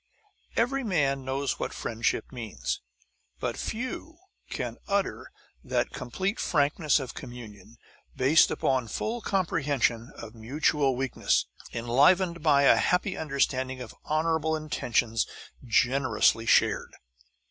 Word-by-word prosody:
Every 270 +4 +1
man 140 - +1
knows 135 +2 -2
what - - -3
friendship 115 0 -2
means, 75 - -4 0.6
but - - -2
few 255 +8 -5 0.3
can - - -4
utter 200 -1 -1 0.3
that - - -1
complete 190 - -3
frankness 150 0 +2
of 130 -3 -6
communion, 115 -4 -10 0.4
based 135 +5 +5
upon 130 -3 0
full 230 - -3
comprehension 140 - 0
of 115 -1 -9
mutual 135 +3 +1
weakness, 130 0 0 0.3
enlivened 170 +9 +3
by 145 -3 +4
a - - +6
happy 180 +2 +1
understanding 130 -3 -1
of 125 -3 -8
honourable 160 0 0
intentions 120 -7 0 0.4
generously 125 -1 +2
shared. - - +3
140 Hz, 110 wpm, -28 LUFS, 120-165 Hz, 0.6 s, a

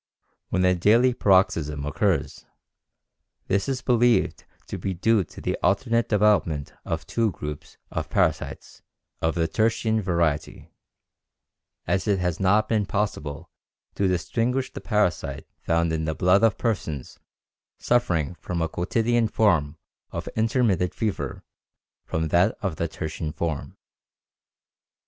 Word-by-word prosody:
When 90 0 +1
a 90 - +5
daily 115 +8 +4
paroxysm 80 -9 +2
occurs, 75 - -1 1.0
this 100 +5 0
is 130 -1 -2
believed 120 -1 +2 0.2
to - - -6
be 95 -1 -3
due 110 +3 +3
to - - -13
the - - -1
alternate 115 +4 +1
development 100 -9 +2
of - - -3
two 115 -2 0
groups 75 0 -7
of - - -3
parasites - - -1 0.4
of 80 0 0
the 85 -1 +1
tertian 110 +2 +1
variety, 85 -5 -1 1.1
as 95 +2 0
it 100 -2 +3
has 90 -3 -1
not 100 +3 +3
been 105 -3 +1
possible 90 -9 -3 0.4
to 100 - +1
distinguish 115 +9 -1
the - - -7
parasite 90 - 0
found 85 0 +1
in 80 0 -1
the 80 0 -2
blood 90 +5 +4
of 115 -3 +4
persons 80 - -3 0.6
suffering 85 - +1
from 90 0 -5
a - - 0
quotidian 115 +8 +1
form 80 -9 +2 0.3
of - - -6
intermittent 110 -6 +1
fever 110 -3 -3 0.6
from 80 0 -2
that 90 +6 +3
of 95 -6 -2
the 85 - -1
tertian 80 0 -5
form. 80 -1 -4
95 Hz, 130 wpm, -25 LUFS, 80-110 Hz, 1.1 s, a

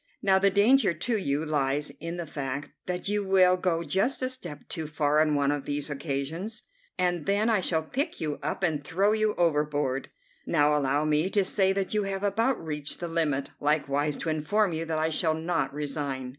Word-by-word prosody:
Now 190 -1 +4
the 200 +1 +4
danger 205 +1 +4
to 225 +9 0
you 150 -6 -1
lies 145 -1 0
in 165 +1 -5
the 170 - -4
fact 140 -1 -5 0.2
that 180 +1 -3
you 205 0 0
will 185 -1 +5
go 180 -2 0
just 195 - 0
a 255 - +1
step 175 - -8
too 160 -3 -5
far 150 0 +2
on 155 -1 +2
one 140 0 +2
of 145 -1 -3
these 145 +1 -3
occasions, 150 +9 -4 0.3
and 175 -3 0
then 205 +3 +2
I 215 - +3
shall 165 -3 +1
pick 280 - -3
you 150 -2 -3
up - - -3
and 155 -4 +1
throw 195 +6 +1
you 215 -1 +1
overboard. 150 -5 0 0.4
Now 150 0 +3
allow 145 +1 +1
me 155 +4 +2
to 200 -1 +2
say 190 0 +2
that 195 0 -2
you 210 - +2
have 195 0 -3
about 225 +6 +1
reached 150 -2 -4
the 175 - -3
limit, 150 -5 0
likewise 145 0 +1
to - - -3
inform 175 +6 +1
you 160 +1 -2
that 160 -1 -2
I 160 +1 +1
shall 160 0 +1
not 165 +1 -1
resign." 140 -3 -4
160 Hz, 200 wpm, -27 LUFS, 145-195 Hz, 0.4 s, will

